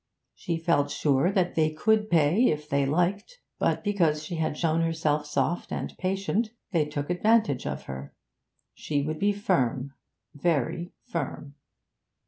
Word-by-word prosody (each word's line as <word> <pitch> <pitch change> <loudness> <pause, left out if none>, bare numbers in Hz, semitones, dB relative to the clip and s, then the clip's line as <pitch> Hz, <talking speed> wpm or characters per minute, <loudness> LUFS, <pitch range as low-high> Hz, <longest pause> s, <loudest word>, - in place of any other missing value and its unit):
She 170 -2 -3
felt 160 -4 +1
sure 145 +5 +2
that 185 -3 +1
they 155 -1 +2
could 215 +7 +1
pay 170 - +4
if 150 0 -1
they 140 -1 +1
liked; 180 - 0 0.2
but - - +1
because 165 -7 +1
she 170 +1 -4
had 155 -2 -1
shown 165 0 +1
herself 155 -2 0
soft 160 +3 -1
and - - -4
patient, 195 +4 0 0.2
they 165 -5 +2
took 145 +1 -4
advantage 210 - +2
of 70 0 -4
her. 65 +1 -8 0.6
She 145 -2 -2
would 155 +1 -3
be 205 +1 +3
firm, 140 - 0 0.4
very 170 +2 -1
firm. 145 -3 -5
160 Hz, 145 wpm, -27 LUFS, 145-185 Hz, 0.6 s, pay